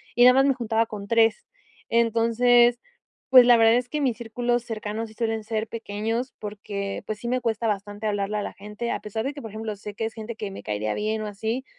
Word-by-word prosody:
y 245 Hz, -, +5 dB
nada 250 Hz, +1 st, +8 dB
más 270 Hz, +1 st, +5 dB
me 275 Hz, -, +4 dB
juntaba 230 Hz, -2 st, 0 dB
con 205 Hz, -2 st, -8 dB
3. 225 Hz, -1 st, +3 dB, 0.4 s
Entonces, 235 Hz, +1 st, +4 dB, 0.5 s
pues 255 Hz, -2 st, +9 dB
la 240 Hz, -1 st, +7 dB
verdad 225 Hz, 0 st, +5 dB
es 245 Hz, 0 st, -1 dB
que 300 Hz, -, -2 dB
mis 250 Hz, -6 st, +1 dB
círculos 240 Hz, +1 st, -1 dB
cercanos 220 Hz, -1 st, -4 dB
sí 220 Hz, -, -16 dB
suelen 225 Hz, -2 st, -1 dB
ser 220 Hz, 0 st, -2 dB
pequeños 225 Hz, +3 st, -3 dB
porque 205 Hz, -1 st, -5 dB
pues 215 Hz, -1 st, -4 dB
sí 235 Hz, -, -6 dB
me 255 Hz, +1 st, 0 dB
cuesta 230 Hz, -1 st, -1 dB
bastante 205 Hz, +1 st, -3 dB
hablarle 205 Hz, 0 st, -1 dB
a 205 Hz, -, -2 dB
la -, -, -5 dB
gente. 210 Hz, +4 st, -6 dB
A -, -, -3 dB
pesar 220 Hz, +2 st, -4 dB
de 280 Hz, -, -2 dB
que, 285 Hz, -, -9 dB
por 225 Hz, -, -8 dB
ejemplo, 215 Hz, 0 st, -5 dB
sé 205 Hz, 0 st, -9 dB
que 225 Hz, -, -2 dB
es 225 Hz, -, -4 dB
gente 225 Hz, +1 st, -7 dB
que 210 Hz, -, -4 dB
me 195 Hz, -, -9 dB
caería 105 Hz, 0 st, -2 dB
bien 215 Hz, +1 st, -2 dB
o 215 Hz, -, -4 dB
así, 220 Hz, +6 st, -3 dB
225 Hz, 235 wpm, -25 LUFS, 210-240 Hz, 0.5 s, pues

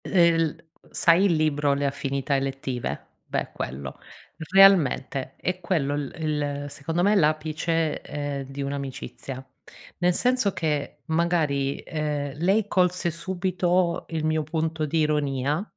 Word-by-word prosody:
Ehm, 165 Hz, -4 st, +3 dB
l -, -, -22 dB, 0.3 s
sai 170 Hz, +3 st, +4 dB
il 190 Hz, -, +4 dB
libro 145 Hz, -2 st, +2 dB
"Le 140 Hz, 0 st, -1 dB
Affinità 140 Hz, 0 st, -1 dB
Elettive"? 135 Hz, -, -3 dB, 0.2 s
Beh, -, -, -2 dB
quello. 65 Hz, +1 st, -6 dB, 0.5 s
Realmente 170 Hz, -9 st, +4 dB
è 180 Hz, +1 st, -2 dB
quello 155 Hz, -6 st, 0 dB
l 145 Hz, -2 st, -3 dB
il 145 Hz, -2 st, -2 dB
secondo 160 Hz, +5 st, -2 dB
me 205 Hz, +2 st, +4 dB
l'apice, 155 Hz, -1 st, +1 dB
ehm, 145 Hz, -2 st, -4 dB
di 135 Hz, +1 st, -7 dB
un'amicizia. 135 Hz, -1 st, -6 dB, 0.5 s
Nel 175 Hz, 0 st, +3 dB
senso 250 Hz, -4 st, +2 dB
che, 150 Hz, -3 st, -2 dB
magari, 160 Hz, -4 st, +1 dB
ehm, 150 Hz, -3 st, -2 dB
lei 195 Hz, +5 st, +2 dB
colse 180 Hz, -2 st, +1 dB
subito 180 Hz, 0 st, 0 dB
il 160 Hz, -2 st, -2 dB
mio 155 Hz, 0 st, +1 dB
punto 160 Hz, 0 st, -1 dB
di 160 Hz, +3 st, 0 dB
ironia, 150 Hz, +1 st, 0 dB
155 Hz, 130 wpm, -25 LUFS, 140-170 Hz, 0.5 s, sai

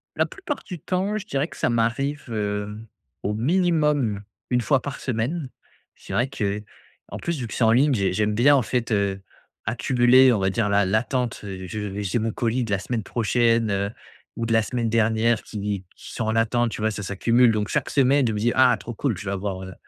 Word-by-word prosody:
La -, -, +1 dB
plupart 345 Hz, -8 st, -5 dB
du 180 Hz, -6 st, -7 dB
temps, 190 Hz, +6 st, -1 dB
je 210 Hz, -, -6 dB
dirais 140 Hz, -4 st, -1 dB
que -, -, -13 dB
ça 120 Hz, -, +1 dB
m'arrive, 120 Hz, +6 st, 0 dB
heu, 105 Hz, -1 st, -3 dB, 0.5 s
au 105 Hz, -, -1 dB
minimum, 150 Hz, -, +1 dB, 0.3 s
1 125 Hz, 0 st, +3 dB
fois 135 Hz, +2 st, +2 dB
par 140 Hz, +3 st, -6 dB
semaine. 130 Hz, +5 st, -2 dB, 0.5 s
C'est -, -, -10 dB
vrai 125 Hz, +2 st, +1 dB
qu'en 105 Hz, -3 st, -6 dB
plus, 170 Hz, -3 st, -3 dB
vu 120 Hz, -, -4 dB
que -, -, -8 dB
c'est 120 Hz, -, +1 dB
en 110 Hz, -, +5 dB
ligne, 135 Hz, +3 st, +4 dB
j'ai 100 Hz, -3 st, 0 dB
j'aime 105 Hz, +1 st, 0 dB
bien, 140 Hz, +5 st, +5 dB
en 135 Hz, -, +3 dB
fait, 120 Hz, 0 st, -2 dB
heu, 100 Hz, -2 st, 0 dB, 0.4 s
accumuler, 125 Hz, +3 st, +4 dB
on 110 Hz, -, +2 dB
va 95 Hz, 0 st, +1 dB
dire 105 Hz, -1 st, 0 dB
l'a 100 Hz, -1 st, +3 dB
l'attente, 120 Hz, +4 st, -1 dB
heu, 95 Hz, -2 st, -6 dB
je 110 Hz, +2 st, -5 dB
vais 105 Hz, 0 st, -4 dB
j'ai 100 Hz, +4 st, 0 dB
mon 110 Hz, 0 st, -1 dB
colis 120 Hz, +3 st, -1 dB
de 115 Hz, -, -5 dB
la 100 Hz, -, +2 dB
semaine 115 Hz, +3 st, -3 dB
prochaine, 115 Hz, 0 st, +1 dB
heu, 100 Hz, 0 st, 0 dB, 0.5 s
ou 115 Hz, -, -2 dB
de 115 Hz, -, 0 dB
la 115 Hz, -, +5 dB
semaine 115 Hz, +1 st, -2 dB
dernière 110 Hz, 0 st, +2 dB
qui 100 Hz, -2 st, -4 dB
qui -, -, -11 dB
sont 115 Hz, -, -2 dB
en 110 Hz, +1 st, 0 dB
attente, 115 Hz, +1 st, +2 dB
tu 110 Hz, -, -6 dB
vois? 110 Hz, 0 st, +1 dB
Ça 105 Hz, -, -5 dB
s'accumule. 115 Hz, +5 st, +3 dB
Donc 105 Hz, -1 st, -1 dB
chaque -, -, -1 dB
semaine, 135 Hz, -1 st, +3 dB
je 110 Hz, -, 0 dB
me -, -, -2 dB
dis: 120 Hz, +3 st, +2 dB
«Ah 130 Hz, -1 st, +5 dB
trop 120 Hz, -, -7 dB
cool, 115 Hz, -3 st, -1 dB
je 100 Hz, -, -8 dB
vais 95 Hz, -, -2 dB
avoir, 95 Hz, -1 st, -3 dB
heu, 95 Hz, -1 st, -8 dB
115 Hz, 225 wpm, -24 LUFS, 105-130 Hz, 0.5 s, en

